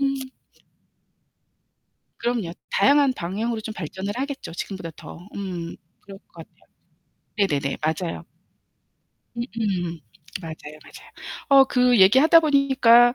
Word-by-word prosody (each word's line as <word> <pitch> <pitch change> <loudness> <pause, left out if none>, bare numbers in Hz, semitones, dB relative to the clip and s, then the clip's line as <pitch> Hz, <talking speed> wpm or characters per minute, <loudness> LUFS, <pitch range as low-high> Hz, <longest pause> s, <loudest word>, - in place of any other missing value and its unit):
음. 275 0 +1 2.0
그럼요. 235 -8 -2 0.2
다양한 280 +5 +4
방향으로 220 +6 -3
좀 220 0 -6
발전을 190 +4 -5
하겠죠, 275 - -5
지금보다 175 0 -6
더. 175 +3 -11
음 180 -4 -5 0.2
그럴 195 -1 -12
것 - - -39
같아요. - - -32 0.7
네네네. 145 -9 0
맞아요. 160 +2 -2 1.1
음음. 200 -8 -3 0.4
맞아요, 155 -2 -9
맞아요. - - -15 0.4
어 275 -1 +7
그 250 -2 +3
얘기 195 +7 +7
하다 325 +3 +7
보니까 265 -5 +5
210 Hz, 240 characters per minute, -23 LUFS, 175-260 Hz, 2.0 s, 어